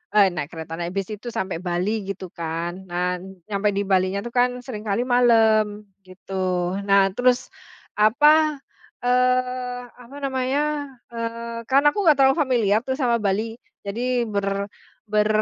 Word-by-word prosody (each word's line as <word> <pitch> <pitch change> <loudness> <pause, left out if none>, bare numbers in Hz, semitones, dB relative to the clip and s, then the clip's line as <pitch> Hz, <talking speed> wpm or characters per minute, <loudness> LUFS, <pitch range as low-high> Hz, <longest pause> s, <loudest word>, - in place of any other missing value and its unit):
Eh, 205 -2 +7
naik 150 -3 -5
kereta. 160 -1 -7
Naik 170 0 -3
bis 195 -2 -1
itu 215 +3 -7
sampai 190 -5 -3
Bali, 185 +4 -1
gitu 195 -1 -5
kan. 170 +2 -4
Nah, 180 +1 -1 0.3
nyampai 205 0 0
di 200 - 0
Balinya 190 0 +2
itu 240 - -6
kan, 250 0 +1
seringkali 220 -2 -3
malam, 220 -4 +3 0.2
gitu. 185 -1 -3
Nah, 195 -1 +4
terus 250 0 +2 0.5
apa, 295 +7 +4 0.4
eee, 250 0 +1 0.2
apa 250 +3 -14
namanya? 280 +3 -1 0.2
Eee, 230 0 -5
kan 275 +1 +4
aku 405 +7 +2
enggak 300 -3 +6
terlalu 270 0 +5
familiar 225 -5 +2
tuh, 260 0 -2
sama 240 -3 +2
Bali. 215 +3 0 0.3
Jadi 240 +3 -1
ber 200 -1 -1 0.4
ber 210 0 +2
220 Hz, 145 wpm, -23 LUFS, 195-250 Hz, 0.5 s, Eh